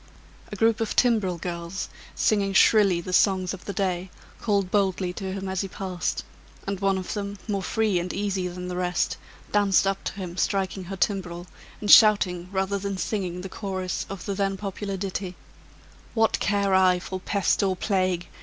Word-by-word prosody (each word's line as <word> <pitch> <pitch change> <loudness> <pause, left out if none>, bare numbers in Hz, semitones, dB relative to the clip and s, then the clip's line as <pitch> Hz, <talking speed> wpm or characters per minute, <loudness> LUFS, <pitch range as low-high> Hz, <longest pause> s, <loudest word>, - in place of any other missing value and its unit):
A - - -4
group 225 +2 +2
of 225 - -1
timbril 215 -8 +2
girls, 170 +2 -4 0.3
singing 200 -2 +2
shrilly 195 -4 +5
the 180 +1 -6
songs 185 -1 +3
of 190 - -9
the - - -3
day, 185 -2 -1 0.3
called 200 -4 +1
boldly 190 -3 +1
to 190 +1 -5
him 195 0 -4
as 190 -1 -1
he 195 - -3
passed; 185 -2 -3 0.4
and 195 -1 -3
one 195 -1 +2
of 185 - -4
them, 200 -1 -4
more 200 -2 -1
free 210 -1 +1
and 175 +1 -3
easy 195 -2 -1
than 180 0 -6
the 180 - -4
rest, 180 0 0 0.3
danced 200 -2 +4
up 195 0 -1
to - - -2
him 185 -3 -7
striking 190 -2 -1
her 195 +2 -6
timbrel, 175 -3 -1 0.3
and 210 - +1
shouting 185 -5 +6
rather 195 +1 0
than 200 0 -3
singing 185 -3 -2
the 190 - -5
chorus 190 -2 -4
of 195 -2 -7
the 200 - -2
then 195 0 -1
popular 195 0 -4
ditty, 190 -1 -4 0.8
"What 225 -1 +3
care 200 -1 +1
I 185 -1 +5
for 185 +1 -5
pest 195 0 +1
or 190 -2 +1
plague? 185 -2 0
190 Hz, 180 wpm, -25 LUFS, 180-200 Hz, 0.8 s, shouting